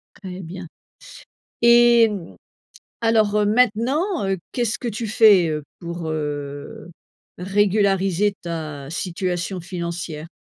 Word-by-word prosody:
Très 185 -2 -8
bien, 180 +1 -8 1.0
et 235 -1 +6
mmh, 195 -5 -7 0.7
alors, 220 -2 +2
heu, 210 - +3
maintenant, 250 - +1
heu, 195 -1 -1
qu'est-ce 240 -1 -1
que 245 - -4
tu 225 +1 -4
fais, 205 -6 +5
heu, 150 -1 -2 0.2
pour, 170 -1 -5
heu, 145 +1 -5 0.5
régulariser 195 0 +1
ta 155 -5 -5
situation 180 +1 -3
financière? 170 -2 -5
190 Hz, 110 wpm, -22 LUFS, 170-220 Hz, 1.0 s, et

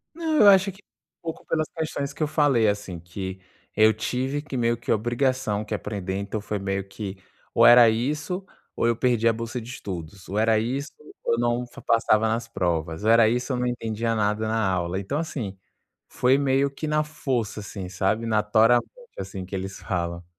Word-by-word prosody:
Não, 320 -2 -1
eu 205 - +8
acho 195 0 +6
que 195 +3 -19 0.4
pouco 165 -1 -6
pelas 155 -1 0
questões 155 -3 -3
que - - -11
eu 150 - +2
falei, 145 -8 +3
assim, 100 -4 -2
que 95 +2 -7 0.3
eu 110 +1 +6
tive 130 +6 -2
que, 140 - -7
meio 120 -1 +1
que 115 - -4
obrigação, 120 -1 0
que 105 - -5
aprender, 100 -2 -3
então 100 +2 -3
foi 105 0 -4
meio 95 0 -2
que 100 -1 -6 0.4
ou - - +5
era 120 -1 +9
isso, 150 - -2 0.3
ou - - 0
eu 115 - +2
perdia 115 -2 +2
a - - -3
bolsa 115 +2 -4
de 115 - -10
estudos; 95 -6 -7
ou 100 - -3
era 110 0 +3
isso, 135 +5 -3 0.3
ou 115 - +1
não 120 +1 0
f 120 - -13
passava 110 -1 +3
nas 115 +1 -1
provas; 85 -4 -2
ou 110 - +2
era 115 -1 +6
isso, 125 +3 0
ou 125 - -1
não 125 - 0
entendia 115 -1 -2
nada 105 0 0
na 110 -2 +1
aula. 90 0 -1
Então, 135 +9 -3
assim, 120 -12 -4 0.5
foi 130 +2 +3
meio 140 0 +2
que 140 +3 -6
na 150 0 +2
força, 130 -8 -3
assim, 100 -2 -7
sabe, 95 +5 0
natoralmente, 110 +2 +3 0.3
assim, 95 -2 -6
que 95 - -6
eles 95 +1 -5
falam. 85 -1 -3
115 Hz, 195 wpm, -25 LUFS, 100-130 Hz, 0.5 s, era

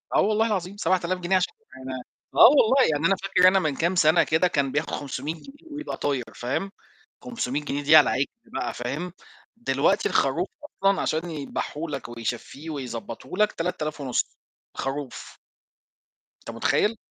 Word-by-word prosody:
آه - - +5
والله 215 +2 +2
العظيم 195 -2 -2
7000 185 -2 0
جنيه 180 +2 +1
عشان 185 0 +1
يبقى 130 - -9
أنا 130 - -5 0.3
آه - - +10
والله، 265 -1 +5
يعني 150 +1 0
أنا 195 - +3
فاكر 190 -1 +3
أنا 190 +1 +5
من 155 -5 -1
كام 170 +6 0
سنة 165 -1 +5
كده 160 +3 +2
كان 140 -5 0
بياخُد 145 +3 -1
500 145 +1 -4
جنيه 290 - -15
ويبقى 300 +1 -5
طاير 140 -3 -1
فاهم، 165 +11 -2 0.5
500 150 - -2
جنيه 145 0 -3
دي 150 +2 +6
على 150 - +10
العِجل 135 +2 +1 0.3
بقى 120 - -2
فاهم، 145 +9 -4 0.4
دلوقتي 165 - +1
الخروف 160 +7 +1 0.2
أصلًا 195 -9 0
عشان 160 +3 -1
يدبحه 150 +1 -4
لك 140 -4 -5
ويشفّيه 120 +6 -5
ويضبّطه 145 - -6
لك 210 0 +3
3500 155 -6 -2 0.4
خروف. 135 -1 -5 1.1
أنت - - -5
متخيّل؟! 205 - +1
160 Hz, 160 wpm, -25 LUFS, 140-195 Hz, 1.1 s, آه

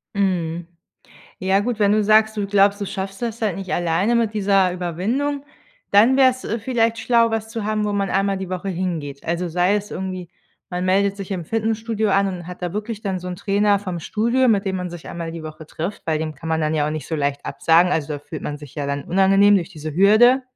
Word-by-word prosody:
Mhm. 175 -4 -1 0.7
Ja 190 +1 +2
gut, 235 +1 -2
wenn 205 -1 +3
du 215 0 +3
sagst, 215 +1 +4
du 205 -1 -1
glaubst, 200 0 +3
du 200 - -2
schaffst 195 0 -5
das 230 -1 -3
halt 205 -5 0
nicht 190 -1 -5
alleine 175 +6 +1
mit 230 -2 +1
dieser 195 -3 +3
Überwindung, 220 - -2 0.5
dann 225 +6 +5
wäre 265 -1 +6
es, 255 0 -9
äh, 230 - -2
vielleicht 230 0 0
schlau, 230 0 +3
was 220 0 -2
zu 225 -1 -5
haben, 215 0 0
wo 210 - -1
man 200 -2 -1
einmal 195 0 +1
die 190 -1 -6
Woche 185 +2 -4
hingeht. 165 -7 -4
Also 170 +2 -2
sei 180 +4 +2
es 205 0 -5
irgendwie, 185 -2 -5 0.4
man 180 0 -3
meldet 195 +2 +2
sich 195 -1 -7
im 180 -4 -3
Fitnessstudio 220 +1 -1
an 195 0 +3
und 180 -3 -6
hat 180 0 -9
da 175 -1 -3
wirklich 210 +1 -4
dann 195 -3 -2
so 180 0 -7
'n 180 - -5
Trainer 205 +1 +2
vom 185 -3 -5
Studio, 235 +8 +1
mit 205 -3 +3
dem 190 -1 -1
man 180 -1 -4
sich 175 -2 -9
einmal 170 -1 -5
die 165 -1 -7
Woche 155 0 -9
trifft, 170 +6 -5
weil 160 -2 +1
dem 155 0 -4
kann 160 +4 -8
man 160 0 0
dann 155 0 0
ja 150 -1 +1
auch - - -1
nicht 155 -3 -5
so 160 - -3
leicht 145 -2 -2
absagen. 170 +2 +3
Also, 155 -3 -1
da - - -5
fühlt 145 +2 -8
man 145 0 -4
sich 145 -3 -12
ja 145 -2 -3
dann 140 0 -3
unangenehm 195 +2 +4
durch 185 -2 0
diese 155 -3 -7
Hürde. 220 - +5
195 Hz, 240 wpm, -21 LUFS, 170-215 Hz, 0.7 s, wäre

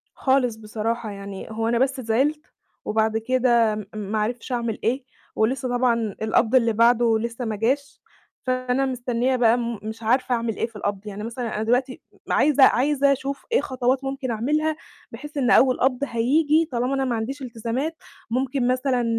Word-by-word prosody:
خالص 260 -4 +1
بصراحة، 220 +1 -3
يعني 200 -1 -7
هو 225 +1 -2
أنا 235 0 +2
بس 265 0 +1
زعِلت، 265 +6 +1 0.4
وبعد 220 +1 +1
كده 235 -2 +2
م 210 -1 -5
ما 210 +1 -3
عرفتش 235 +4 -3
أعمل 235 -3 -2
ايه، 250 +3 0 0.3
ولسه 255 +4 0
طبعًا 235 -4 +1
القبض 220 +2 +2
اللي 230 -3 +4
بعدُه 230 0 +4
لسَّه 235 +2 -4
ما 220 -2 -2
جاش، 270 +7 -1 0.4
فأنا 255 +1 0
مستنية 250 0 0
بقى 240 -1 +4 0.2
مش 220 +1 -7
عارفة 250 +3 +2
أعمل 230 -2 -2
إيه - - 0
في 230 -2 -16
القبض، 205 0 -3
يعني 210 +1 -6
مثلًا 230 0 -4
أنا 215 - -2
دلوقتي 250 +3 0 0.3
عايزة 290 -2 +5
عايزة 280 +2 +3
أشوف 275 0 -4
إيه 480 - +4
خطوات 260 +1 -1
ممكن 270 -1 -3
أعملها، 300 +7 0 0.4
بحيث 295 +1 -9
إن 255 -3 +1
أول 255 0 +5
قبض 255 -1 +2
هييجي 295 +7 +2
طالما 250 +3 0
أنا 270 0 0
ما 240 -3 -1
عنديش 270 +6 -4
إلتزامات، 250 +6 -3 0.3
ممكن 255 +1 0
مثلًا 255 -1 +1
245 Hz, 170 wpm, -23 LUFS, 225-265 Hz, 0.4 s, عايزة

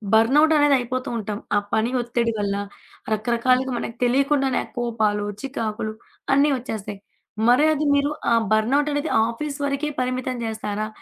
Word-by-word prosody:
Burnout 290 +8 +5
అనేదయిపోతూ 255 -3 +1
ఉంటాం. 210 -1 -4 0.2
ఆ - - +5 0.2
పని 225 +3 +1
ఒత్తిడి 235 -1 -1
వల్ల, 200 -1 -1 0.6
రకరకాలుగా 250 +4 +1
మనకు 230 0 -5
తెలియకుండానే 270 +2 +2
ఆ - - -17
కోపాలు, 215 -3 0 0.2
చికాకులు, 220 -5 -3 0.4
అన్ని 285 +2 +4
ఒచ్చేస్తాయి. 215 -5 -6 0.5
మరే 255 +5 +5
అది 305 0 -1
మీరు 285 0 +2 0.2
ఆ - - +5 0.2
బర్న్‌అవుటనేది 285 +7 +1 0.2
ఆఫీస్ 280 +5 -4
వరకే 280 +2 -1
పరిమితం 255 0 -2
జేస్తారా? 215 -1 -3
245 Hz, 130 wpm, -23 LUFS, 220-280 Hz, 0.6 s, Burnout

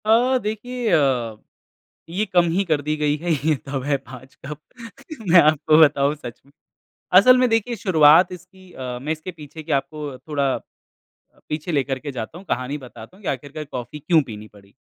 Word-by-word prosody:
अ, 240 +4 +4
देखिए 230 +3 -3
अ, 125 -6 +1 0.7
ये 195 +6 -1
कम 180 -4 +3
ही 190 +4 +1
कर 155 -4 0
दी 150 +2 -2
गई 150 -1 +1
है। 170 +3 -3
ये 155 +1 +1
तब 135 -2 -4
है 140 0 +1
5 130 0 -14
कप 150 +2 -6 0.7
मैं 170 0 +8
आपको 155 0 +3
बताऊँ 145 -1 +4
सच 120 -6 -10
में 140 - -23 0.7
असल 255 +6 +7
में 250 0 +3
देखिए 225 +1 0
शुरुआत 170 -4 +5
इसकी 185 +1 -14
अ, 125 -1 -6
मैं 150 +4 -3
इसके 160 +4 -8
पीछे 155 -1 -11
की 155 - -6
आपको 145 -1 -3
थोड़ा 140 -2 -1
अ, - - -7 0.9
पीछे 155 +3 -4
लेकर 135 -2 0
के 145 +3 -6
जाता 125 +6 -6
हूँ। 190 - -13
कहानी 130 +4 -2
बताता 135 +7 -13
हूँ 205 - -20
कि - - -4
आख़िरकार 145 +3 -6
कॉफ़ी 125 +4 -6
क्यों 160 +1 +3
पीनी 110 -4 -10
पड़ी। 100 -1 -20
150 Hz, 190 wpm, -22 LUFS, 135-180 Hz, 0.9 s, मैं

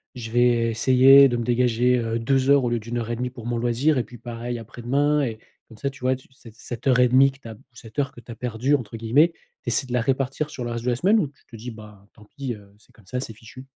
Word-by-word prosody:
je 115 -2 -7
vais 120 -1 +3
essayer 130 +4 +7
de 120 -2 -1
me 120 - -2
dégager 125 +1 +2
heu, 115 0 -2
2 135 +3 +3
au 120 - 0
lieu 120 0 0
de 110 - -14
1:30 120 +1 -3
pour 120 -2 -11
mon 120 0 -2
loisir 120 +6 +1
et 125 - +1
puis 120 +2 -13
pareil 120 +1 -6
après-demain» 135 +6 0
et 110 -4 -4 0.3
comme 110 - -15
ça 140 - -2
tu 130 - -14
vois 130 +1 +1
tu, 130 - -16
cette 115 -4 -16
cette 120 +3 -7
heure 125 -1 +4
et 125 - +6
demie 135 +2 +5
que 135 - -20
tu 125 - -12
as, 110 - -8 0.2
cette 115 +3 -9
heure 140 0 0
que 120 - -13
tu 120 - -12
as - - -7
perdue 125 +4 0
entre 115 -5 -5
guillemets, 140 +10 +3 0.3
tu - - -28
essaies 125 +3 0
de 125 - -6
la 125 - +2
répartir 135 +4 -1
sur 125 - -6
le 120 - -4
reste 115 0 -5
de 125 - +1
la 120 - +1
semaine 195 - +3
ou 155 - 0
tu 135 - -23
te 115 - -14
dis: 120 +3 -7
«Bah, 105 -2 -14
tant 105 - -18
pis, 135 +2 -6
heu, 100 -1 -17
c'est - - -25
comme 110 - -22
ça, 125 - -4
c'est 115 -3 -6
fichu»? 115 +4 -13
120 Hz, 285 wpm, -23 LUFS, 115-135 Hz, 0.3 s, essayer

